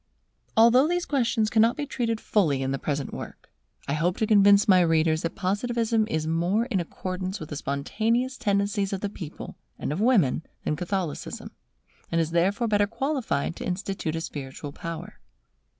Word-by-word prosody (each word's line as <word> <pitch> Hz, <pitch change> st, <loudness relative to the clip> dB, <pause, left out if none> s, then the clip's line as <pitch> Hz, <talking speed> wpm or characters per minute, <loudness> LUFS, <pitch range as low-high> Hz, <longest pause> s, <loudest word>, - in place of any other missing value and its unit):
Although 235 Hz, +5 st, +6 dB
these 350 Hz, +1 st, 0 dB
questions 235 Hz, -5 st, +1 dB
cannot 230 Hz, +2 st, +4 dB
be 295 Hz, -, -2 dB
treated 235 Hz, -5 st, -2 dB
fully 150 Hz, -14 st, +1 dB
in 135 Hz, -, -1 dB
the 135 Hz, -, -2 dB
present 140 Hz, -1 st, -3 dB
work, -, -, -9 dB, 0.4 s
I 140 Hz, -, 0 dB
hope 170 Hz, +4 st, 0 dB
to 220 Hz, -, +1 dB
convince 205 Hz, -1 st, +5 dB
my 185 Hz, -3 st, +6 dB
readers 160 Hz, -1 st, +2 dB
that 165 Hz, -, -3 dB
Positivism 220 Hz, +3 st, 0 dB
is 160 Hz, -7 st, -1 dB
more 175 Hz, +8 st, +1 dB
in 230 Hz, -7 st, -1 dB
accordance 185 Hz, +3 st, -4 dB
with 155 Hz, -, -8 dB
the 150 Hz, -, -5 dB
spontaneous 220 Hz, -, -1 dB
tendencies 200 Hz, -3 st, 0 dB
of 195 Hz, -, -3 dB
the 205 Hz, -, -2 dB
people 165 Hz, -7 st, -8 dB, 0.2 s
and -, -, -3 dB
of 175 Hz, -, -3 dB
women 210 Hz, -, +3 dB, 0.2 s
than 150 Hz, -, 0 dB
Catholicism, 180 Hz, -1 st, -4 dB, 0.6 s
and 165 Hz, -, +2 dB
is 165 Hz, -1 st, 0 dB
therefore 195 Hz, +8 st, +1 dB
better 205 Hz, -1 st, +2 dB
qualified 230 Hz, -, -1 dB
to -, -, -6 dB
institute 185 Hz, -3 st, -3 dB
a 165 Hz, -, -2 dB
spiritual 140 Hz, -2 st, -6 dB
power. 165 Hz, +1 st, -7 dB
195 Hz, 170 wpm, -26 LUFS, 165-225 Hz, 0.6 s, Although